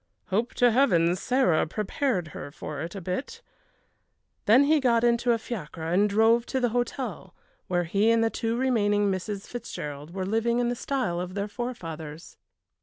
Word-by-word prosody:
"Hope 220 +6 0
to 245 -1 +4
Heavens 180 -9 +3
Sarah 250 -13 +2
prepared 210 - -1
her 145 - -7
for 140 0 -7
it 170 +5 -6
a 195 - -5
bit." 260 - -4 1.0
Then 235 +6 +7
he 305 +2 +4
got 240 -4 +2
into 240 0 +3
a 230 - +3
fiacre 190 - -7
and 185 +6 +2
drove 225 +3 +3
to 265 - -1
the 245 -1 +1
hotel, 245 +2 -3 0.3
where 175 -1 +1
he 200 +6 +2
and 230 0 +4
the 225 - +1
two 230 0 -2
remaining 205 -6 +2
Misses 195 +2 -4
Fitzgerald 150 -11 -7
were 190 +1 -3
living 225 +4 +1
in 240 0 +1
the 245 - -1
style 245 -9 -2
of 180 +1 -6
their 200 0 -2
forefathers. 165 -10 -6
215 Hz, 175 wpm, -27 LUFS, 180-240 Hz, 1.0 s, Then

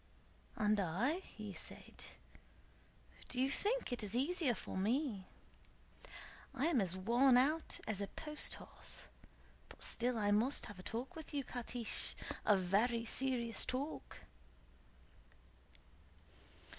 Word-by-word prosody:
"And 210 -1 +3
I?" 200 - +1
he 215 - -8
said; - - -7 1.2
"do 250 - -2
you 265 +2 +3
think 455 - +1
it 245 - -2
is 210 +1 +1
easier 280 -1 +2
for - - -6
me? 215 0 0 1.3
I 270 +2 +1
am 315 -8 +4
as 185 -2 +1
worn 245 +6 +5
out 300 +6 +2
as 205 -2 0
a 200 - -1
post 300 +6 -3
horse, - - -8 0.7
but - - -10
still 245 0 +2
I 205 -1 +2
must 230 +7 +3
have 205 - -9
a - - -6
talk 240 - -4
with 315 -2 -7
you, 280 - 0
Catiche, 245 -2 -2 0.3
a 205 - +7
very 220 +6 +2
serious 240 -2 +2
talk." 275 +5 -3
245 Hz, 125 wpm, -38 LUFS, 210-275 Hz, 1.3 s, a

